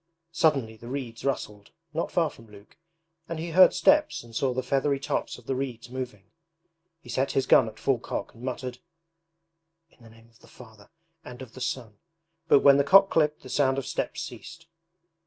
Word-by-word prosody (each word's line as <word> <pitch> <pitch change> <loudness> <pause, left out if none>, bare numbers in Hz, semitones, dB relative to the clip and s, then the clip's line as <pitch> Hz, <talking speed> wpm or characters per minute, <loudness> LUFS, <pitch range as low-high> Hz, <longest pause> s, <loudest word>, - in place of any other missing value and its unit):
Suddenly 135 -9 +1
the 120 - -12
reeds 120 -3 -6
rustled 105 -7 -3 0.2
not 165 - -2
far 165 -4 +1
from 115 - -16
Luke 105 -1 -17 0.5
and 165 - -4
he 165 +1 -5
heard 185 +3 +7
steps 305 - +3
and 115 -1 -14
saw 130 +2 +1
the 130 +1 -2
feathery 140 +2 0
tops 140 - -3
of - - -17
the - - -2
reeds 125 -3 -5
moving. 120 -6 -7 0.7
He - - -18
set 130 +3 -1
his 135 - +1
gun 115 - +5
at 110 -1 -9
full 135 -3 0
cock - - -5
and 115 - -16
muttered: 125 -1 -5 1.1
'In - - -27
the 115 - -15
name 115 0 -19
of 115 0 -26
the - - -19
Father 110 -4 -16 0.3
and 125 -3 -9
of 120 -2 -14
the 130 - -11
Son,' 120 -4 -4 0.5
but 140 - +6
when 140 -1 +7
the 140 - +3
cock 195 +6 +6
clicked 150 -1 +1
the 130 - -11
sound 135 0 +1
of 135 - -3
steps - - -3
ceased. 165 0 -10
130 Hz, 195 wpm, -27 LUFS, 115-140 Hz, 1.1 s, heard